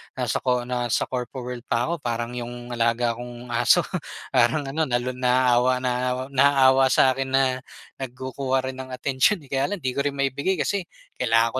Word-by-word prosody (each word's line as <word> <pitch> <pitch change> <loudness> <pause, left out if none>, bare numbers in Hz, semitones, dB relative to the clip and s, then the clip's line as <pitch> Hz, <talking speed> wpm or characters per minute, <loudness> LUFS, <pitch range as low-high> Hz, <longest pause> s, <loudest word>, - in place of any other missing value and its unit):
nasa - - -1
co 125 -1 +1
nasa 120 -2 0
corpo 125 0 -4
world 125 -1 -6
pa 120 +4 +1
ako, 170 - -1
parang 120 -2 -3
yung 120 0 -6
alaga 115 0 +1
kong 120 0 -9
aso. 120 0 +4 0.5
Parang 125 +4 +3
ano, 155 +4 0
nalu 120 0 0
naaawa, 125 0 +3
nao 125 +1 -1
naawawa 135 -1 +5
sa'kin 130 +1 +3
na, 135 0 +4 0.6
nagkukuha 130 +1 -2
rin 130 - -12
ng 130 0 -7
atensyon 135 +7 +1
eh, 135 - -17
kaya 135 +1 +1
lang, 205 - -3
'di 130 - 0
ko - - -1
rin 145 -1 -1
maibigay 140 +7 0
kasi, 200 -2 0 0.4
kailangan 115 +1 +2
125 Hz, 170 wpm, -24 LUFS, 120-135 Hz, 0.6 s, naawawa